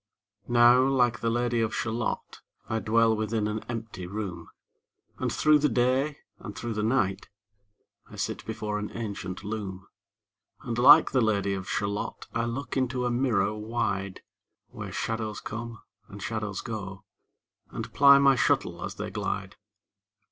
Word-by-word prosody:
Now 120 +1 +6
like 125 -3 +2
the 115 - 0
Lady 120 0 +1
of 110 -1 -1
Shalott, 115 0 -3 0.3
I 110 - -1
dwell 115 +1 +3
within 110 0 -1
an 105 0 -3
empty 110 -6 -5
room, 95 -4 -5 0.7
And - - -1
through 155 -1 +4
the 150 0 +2
day 130 +5 +1 0.2
and 105 - -8
through 120 -1 -3
the 105 - -2
night 105 -4 0 0.8
I - - -11
sit - - -3
before 105 -1 -3
an 105 - -4
ancient 100 -4 -5
loom. 100 -3 -5 0.8
And 120 0 -3
like 145 +6 +8
the 130 - +3
Lady 100 -3 +1
of 95 -1 -5
Shalott 100 0 -3
I 115 0 0
look 120 +2 -4
into 130 -1 0
a 120 - 0
mirror 120 -4 +1
wide, 105 -3 -3 0.5
Where - - -7
shadows 110 -1 -3
come, 115 0 -7 0.2
and 100 - -10
shadows 105 -1 -3
go, 95 -5 -6 0.7
And - - -6
ply 140 0 +8
my 140 -1 +5
shuttle 125 - +1
as - - -5
they - - -5
glide. - - -3
115 Hz, 150 wpm, -27 LUFS, 105-120 Hz, 0.8 s, like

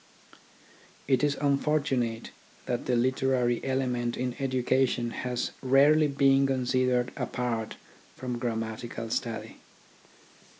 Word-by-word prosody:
It 130 0 +2
is 145 -1 +1
unfortunate 140 -5 0 0.3
that 120 -1 -3
the 125 - +2
literary 130 -1 +1
element 125 -3 -1
in 125 -1 -2
education 130 -2 +1
has 125 0 -3
rarely 145 +4 +5
been 135 -1 +3
considered 125 -1 +1
apart 115 -3 -3 0.4
from 125 -2 -4
grammatical 115 -1 -4
study. 115 -2 -3
125 Hz, 95 wpm, -28 LUFS, 120-135 Hz, 0.4 s, rarely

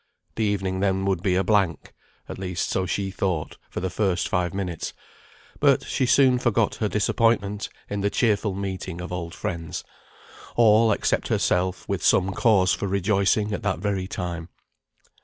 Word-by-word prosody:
The 110 - -1
evening 95 -3 -1
then 95 0 +1
would 95 -3 0
be 95 -2 +1
a 95 - +2
blank; 95 -8 +1 0.3
at - - -7
least 90 -3 -2
so 95 -1 0
she 95 +2 -2
thought 90 -5 -2
for - - -5
the 95 - -1
first 95 -2 0
five 90 -2 0
minutes; 90 -4 -4 0.7
but - - +4
she 130 - -1
soon 130 -1 +5
forgot 115 -3 +1
her 110 - 0
disappointment 105 -1 +1 0.2
in 100 0 -3
the 100 - +1
cheerful 105 -2 +1
meeting 95 -2 -4
of 90 +1 -6
old 85 -1 -5
friends, 85 -2 -4 0.7
all, 115 -1 +5
except - - 0
herself, 90 +1 0
with - - -2
some 95 +1 +3
cause 95 -5 +3
for 100 - -2
rejoicing 100 +2 +1
at - - -3
that 95 -4 -1
very 95 0 -2
time. 85 -2 -5
95 Hz, 165 wpm, -24 LUFS, 90-105 Hz, 0.7 s, soon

